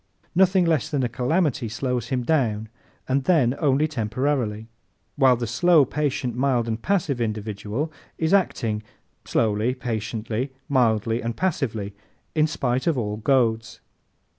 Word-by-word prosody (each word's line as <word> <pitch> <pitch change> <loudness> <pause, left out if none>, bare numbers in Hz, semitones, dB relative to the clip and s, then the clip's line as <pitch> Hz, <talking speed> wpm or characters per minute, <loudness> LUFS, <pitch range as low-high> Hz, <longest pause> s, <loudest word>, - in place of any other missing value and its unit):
Nothing 185 0 +4
less 160 -6 +1
than 140 -3 0
a - - +2
calamity 130 0 0
slows 125 +1 -2
him 125 -1 -1
down 115 -7 0 0.4
and 130 0 0
then 145 -9 +3
only 150 0 +2
temporarily; 115 -3 -1 0.5
while 130 -3 +5
the 120 0 -3
slow, 160 +6 +4
patient, 130 -4 -2
mild 125 -2 +1
and 115 0 -3
passive 160 -9 0
individual 110 +6 -3 0.2
is 160 +3 0
acting 115 - +1 0.4
slowly, 110 +3 +1
patiently, 115 +1 -3
mildly 115 -3 +2
and 115 0 -4
passively 115 - -1 0.4
in 155 -1 +3
spite 130 -2 -1
of 165 -5 +2
all 105 -3 -2
goads. 115 -2 +1
125 Hz, 135 wpm, -24 LUFS, 110-145 Hz, 0.5 s, while